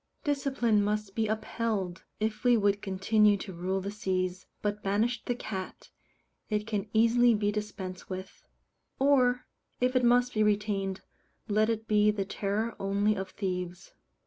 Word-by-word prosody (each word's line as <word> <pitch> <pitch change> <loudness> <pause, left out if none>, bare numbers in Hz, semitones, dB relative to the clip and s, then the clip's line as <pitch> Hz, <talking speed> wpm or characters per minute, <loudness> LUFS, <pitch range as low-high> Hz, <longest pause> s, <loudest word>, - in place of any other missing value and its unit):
Discipline 265 -7 +1
must 210 -1 -1
be 220 0 0
upheld, 215 -4 -2
if 215 0 -2
we 245 -1 +5
would 200 -1 +2
continue 205 +2 +3
to 190 -1 -7
rule 185 +3 -2
the 200 +2 -4
seas; 185 -3 -2 0.2
but 210 0 -1
banish 220 +5 0
the 245 - -1
cat, 190 -6 -6 0.6
it 210 -1 0
can 210 -2 -3
easily 230 +1 +5
be 205 0 +1
dispensed 205 -3 -5
with; 185 0 -7 0.5
or, 255 -3 +3 0.3
if 250 +1 +1
it 255 - +3
must 245 +1 +4
be 215 - +1
retained, 205 -2 0 0.5
let 215 +1 +2
it 225 -1 -2
be 210 0 +4
the 205 -2 0
terror 205 +4 -2
only 200 +2 +1
of 190 -1 -4
thieves. 180 -2 -4
210 Hz, 150 wpm, -29 LUFS, 195-225 Hz, 0.6 s, we